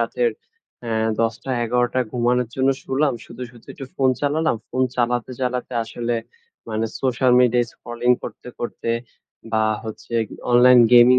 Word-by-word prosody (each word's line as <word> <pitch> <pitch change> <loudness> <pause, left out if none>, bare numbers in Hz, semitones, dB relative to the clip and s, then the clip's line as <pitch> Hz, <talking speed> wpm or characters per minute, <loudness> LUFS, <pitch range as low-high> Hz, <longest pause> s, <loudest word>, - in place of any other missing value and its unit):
রাতের 475 -1 +1 0.5
অ্যা 110 -1 0
১০টা, 115 +3 -1 0.2
১১টা 125 +2 +1
ঘুমানোর 125 0 +1
জন্য 130 0 +2 0.2
শুলাম, 140 +2 +1
শুতে, 120 +2 -10
শুতে 120 -2 -18
একটু 135 - -8
ফোন 130 -1 +3
চালালাম, 150 -2 +1
ফোন 130 - 0
চালাতে, 120 0 0
চালাতে 125 0 -2
আসলে 120 +1 -3 0.5
মানে 110 0 -1 0.2
সোশ্যাল 130 -1 +2
মিডিয়া 125 -1 +4
স্ক্রলিং 120 +1 -2
করতে, - - -8
করতে 120 -1 -3 0.6
বা 110 0 +3 0.2
হচ্ছে 110 +2 -7 0.4
অনলাইন 125 0 +7
গেমিং 125 +1 +8
125 Hz, 140 wpm, -22 LUFS, 120-130 Hz, 0.6 s, গেমিং